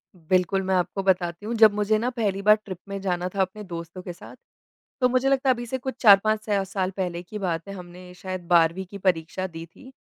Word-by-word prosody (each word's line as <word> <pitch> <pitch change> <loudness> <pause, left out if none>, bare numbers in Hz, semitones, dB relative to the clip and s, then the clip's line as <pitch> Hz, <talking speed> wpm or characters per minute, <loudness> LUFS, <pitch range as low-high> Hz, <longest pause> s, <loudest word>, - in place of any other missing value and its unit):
बिल्कुल, 185 +3 +1
मैं 190 0 0
आपको 185 +2 -1
बताती 180 0 0
हूँ, 230 - -3
जब 215 -2 +7
मुझे 210 +1 +1
ना 240 +3 -1
पहली 205 -6 -2
बार 210 +1 +6
ट्रिप 185 -3 -6
में 195 - -4
जाना 180 -1 -1
था 195 - +1
अपने 200 +3 -3
दोस्तों 170 0 -7
के 180 -1 -7
साथ, 175 - -13 0.7
तो 250 - +4
मुझे 255 +2 +2
लगता 270 0 +2
है 255 - +6
अभी 240 - -6
से 260 +3 -3
कुछ 260 -1 -5
4-5 215 0 +6
सा 200 -2 +1
साल 190 -1 -2
पहले 175 -2 -3
की 210 +4 -8
बात 170 -2 -2
है, - - -5
हमने 180 0 -11
शायद 185 -2 -6
12वीं 170 +2 +3
की 200 - -7
परीक्षा 185 0 -1
दी 165 -2 -9
थी। 255 +11 -16
190 Hz, 235 wpm, -25 LUFS, 180-215 Hz, 0.7 s, जब